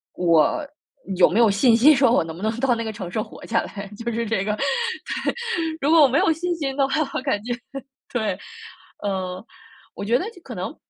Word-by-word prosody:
我 170 - +3 0.5
有 180 - +5
没 195 - -1
有 230 - +6
信 225 +4 +4
心 290 +6 +7
说 265 -2 +4
我 235 - +3
能 160 0 -7
不 175 - -10
能 220 +1 0
到 265 -1 +2
那 230 -1 -2
个 220 - -3
城 195 -5 -7
市 215 - -1
活 - - -10
下 230 - +1
来， 200 -1 -7 0.2
就 235 - -2
是 230 +1 -2
这 220 -3 0
个， 210 +1 -1
对。 275 - -2 0.5
如 285 - +2
果 325 -1 +7
我 285 - +8
没 265 +2 +1
有 370 -2 +3
信 350 +2 -2
心 275 -5 -3
的 275 -1 +2
话， 270 - -1 0.2
我 - - -2
感 265 -7 0
觉 240 +1 -2 0.6
对， 220 -4 0 0.7
嗯， 185 -1 -3 0.5
我 - - -6
觉 235 +4 +3
得 - - -3
就 360 - -17
可 245 - -8
能 180 0 -5
230 Hz, 240 characters per minute, -23 LUFS, 200-275 Hz, 0.7 s, 我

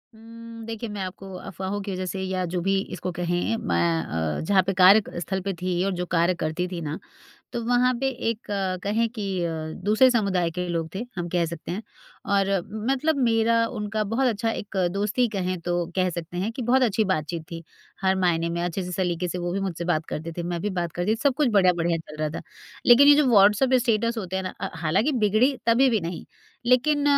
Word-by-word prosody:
उम्म, 230 0 -11
देखिए 225 0 -5
मैं 200 - -4
आपको 190 +1 -6 0.2
अफवाहों 190 +2 -4
की 200 - -3
वजह 185 0 -3
से 190 +1 -4
या 185 -1 -2
जो - - +1
भी 195 - +2 0.2
इसको 180 - -4
कहें 175 +5 -1
मैं 80 - 0
अ, - - -3
जहाँ 195 -2 +5
पे 195 +1 -1
कार्य 190 +4 +7
क - - -6
स्थल 190 +3 -2
पे 195 - -1
थी 185 0 -1
और 195 - 0
जो 180 - -1
कार्य 170 +1 +2
करती 160 +3 -1
थी 170 -2 -4
ना, 150 +1 -4 0.6
तो 235 -1 -3
वहाँ 245 +1 +3
पे 270 - +1 0.2
एक 220 - -3 0.5
कहें 225 +3 +1
कि 215 -3 -5 0.2
अ, 170 - -1 0.3
दूसरे 220 +5 +5
समुदाय 195 -7 +1
के 180 +2 -3
लोग 165 -2 -2
थे 215 +6 -3
हम 175 -1 -3
कह 175 0 +1
सकते 170 0 -6
हैं। 205 +5 -4 0.4
और 200 -1 +2 0.4
मतलब 305 +3 +1
मेरा 230 0 +3
उनका 215 -2 -3
बहुत 265 +1 +2
अच्छा 225 0 -1
एक 205 -2 -6 0.2
दोस्ती 210 +5 +1
कहें 185 -1 -1
तो 175 - +1 0.2
कह 185 -1 +2
सकते 170 +1 -6
हैं 200 +5 -1
कि 250 - -5
बहुत 260 0 +5
अच्छी 220 -2 +2
बातचीत 160 0 -3
थी। 165 0 -6 0.4
हर 190 0 +3
मायने 170 -2 +1
में 170 +1 -2
अच्छे 175 +2 -2
से 180 - -6
सलीके 180 -1 -1
से 180 - -3
वो 175 0 -2
भी 195 - -1
मुझसे 175 -3 -3
बात 155 +1 -1
करते 165 +2 -5
थे, 175 - -5
मैं 170 -1 -3
भी 210 - -2
बात 170 -2 -3
करती 175 +4 -1
थी, - - 0
सब 280 -3 +3
कुछ 290 -2 +2
बढ़िया-बढ़िया 175 -4 +3
चल 150 - -9
रहा 155 - 0
था। - - -14 0.4
लेकिन 270 +4 +8
ये 290 - +9
जो 295 -2 +3
व्हाट्सऐप 210 +5 +5
स्टेटस 230 -2 +1
होते 190 -2 -4
हैं 190 - -1
ना 185 - -5
अ, 195 - -3
हालाँकि 175 - +1
बिगड़ी 235 +7 +3
तभी 240 +3 +5
भी 220 - +1
नहीं, 170 0 -5 0.4
लेकिन 285 +4 +3
195 Hz, 225 wpm, -25 LUFS, 175-230 Hz, 0.6 s, ये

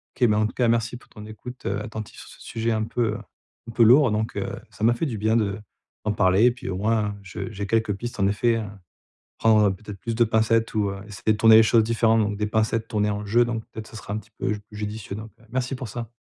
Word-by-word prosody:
OK, 125 - +3
ben 105 -1 +2
en 110 - +3
tout - - -9
cas 125 - +1
merci 115 +1 0
pour - - -21
ton 105 - -11
écoute, 125 +4 -10
heu, 100 +2 -1
attentive 110 -1 -7
sur - - -12
ce - - -15
sujet 115 0 -2
un 110 0 0
peu, 115 -1 -1
heu, - - -4 0.5
un - - -5
peu 115 0 +4
lourd, 125 +1 +6
donc 110 +1 -2
heu, - - -2 0.2
ça 110 - -8
m'a 115 - +5
fait 120 - -2
du 120 -7 -3
bien 110 +2 +1
de 100 -1 -1 0.5
d'en 105 - +1
parler, 95 +2 +4
et 125 - +6
puis 125 -3 -8
au 90 - -3
moins 105 0 0
je 95 +2 -6
j'ai 100 -1 -5
quelques 110 -1 +1
pistes 120 +1 -6
en 100 - +3
effet 115 +4 +2
hein. 100 -2 -6 0.6
Prendre, 110 -2 +5
heu, 95 - -1
peut-être 100 0 -10
plus 115 -1 -3
de 120 - +5
pincettes 110 0 +1
ou 105 -2 +1
heu, 100 - -6
essayer 110 +1 -1
de - - -2
tourner 110 0 +7
les 110 - +9
choses 110 0 +4
différemment 115 -1 +3
donc 105 0 -2
des 105 0 -1
pincettes 110 +1 0
tournées 105 -2 0
en 105 0 -3
«je» 110 +4 +1
donc 115 -2 -3
peut-être 110 0 -8
ça 110 - -12
sera 105 - -7
un 105 - -1
petit 110 +1 -15
peu - - 0
j 105 - -4
judicieux, 105 -1 -5
donc 110 +1 -8
heu, - - -20
merci 130 +2 -2
pour 125 -2 -6
ça. 115 +2 -6
110 Hz, 275 wpm, -24 LUFS, 105-115 Hz, 0.6 s, les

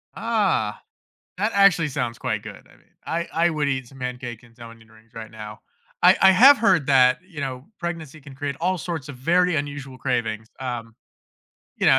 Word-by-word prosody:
Ah, 200 - 0 0.6
that 210 +4 0
actually 195 -6 +4
sounds 125 -5 -3
quite - - -2
good, - - -11
I - - -21
mean, - - -29 0.2
I 170 +1 -2 0.2
I - - +3
would 150 -3 -1
eat 130 -3 -2
some 135 - -16
pancake 125 -2 -6
and 115 0 -21
some 115 -1 -11
onion 115 -1 -17
rings 110 0 -22
right 110 -1 -8
now. 105 -2 -10 0.4
I - - +7
I 190 - +8
have 260 +10 +8
heard 165 -11 +3
that, 130 -2 +5
you 165 -6 -9
know, 130 0 -5
pregnancy 160 -3 -6
can 140 -1 -13
create 140 0 -4
all 185 +1 0
sorts 160 -5 -5
of 145 - -8
very 175 +5 +2
unusual 140 -2 -5
cravings, 115 -4 -2
um, 120 -3 -5 0.8
you - - 0
know, - - +6
135 Hz, 195 wpm, -23 LUFS, 120-170 Hz, 0.8 s, I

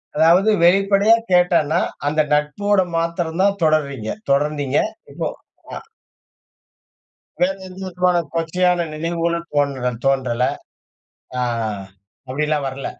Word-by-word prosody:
அதாவது 170 +7 +4
வெளிப்படையா 195 +4 +5 0.2
கேட்டானா? 175 -3 +3 0.3
அந்த 155 +1 +2
நட்போட 190 +7 +1 0.2
மாத்திரம் 170 0 -2
தான் 200 0 +1
தொடர்றீங்க, 140 -7 0 0.2
தொடர்ந்தீங்க 145 -1 +1 0.3
இப்போ. - - -3 0.5
அ - - -4 1.6
வேறு 190 +2 +1
எந்த 185 0 -11
விதமான 180 0 +1 0.2
கொச்சையான 175 +1 +1
நினைவுகளும் 170 +1 -2
தோன்ற 140 -4 0
தோன்றல? 130 -3 +1 1.0
அ - - 0 0.9
அப்டிலாம் 150 +1 -1
வரல. 135 +1 -6
165 Hz, 95 wpm, -20 LUFS, 145-180 Hz, 1.6 s, வெளிப்படையா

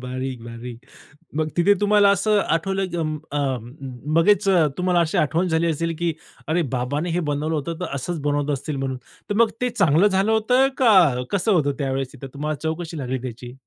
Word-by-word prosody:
भारी-भारी. 125 -2 -6 0.6
मग 155 0 0
तिथे 185 +4 +5
तुम्हाला 205 -1 +5
असं 210 +1 +2 0.2
आठवलं 195 +3 -2
की 175 - -4
म 155 -2 -2
अ, 145 - -2 0.8
लगेच 205 +4 +3
अ, 175 -5 +4
तुम्हाला 180 -1 +2
अशी 160 - -1
आठवण 165 +5 +1
झाली 165 0 +1
असेल 165 +1 -1
की 170 -1 0 0.3
अरे, 165 +3 +1
बाबांनी 145 +7 -2
हे - - +1
बनवलं 155 +3 -1
होतं, 160 +2 -4
तर - - -4
असंच 170 +5 -4
बनवत 145 0 0
असतील 150 +2 -5
म्हणून. 130 -1 -3 0.3
तर 205 - -1
मग 225 - -1
ते 250 - +1
चांगलं 190 -4 +3
झालं 195 +2 +1
होतं 250 +5 +3
का, 185 - +5
कसं 200 +2 +1
होतं 150 -6 +3
त्यावेळेस? 135 -1 -2
तिथं 135 -1 -9
तुम्हाला 150 +2 -3
चव 160 - +1
कशी 165 -1 -7
लागली 130 -2 -2
त्याची? 120 +1 -9
160 Hz, 190 wpm, -22 LUFS, 140-190 Hz, 0.8 s, तिथे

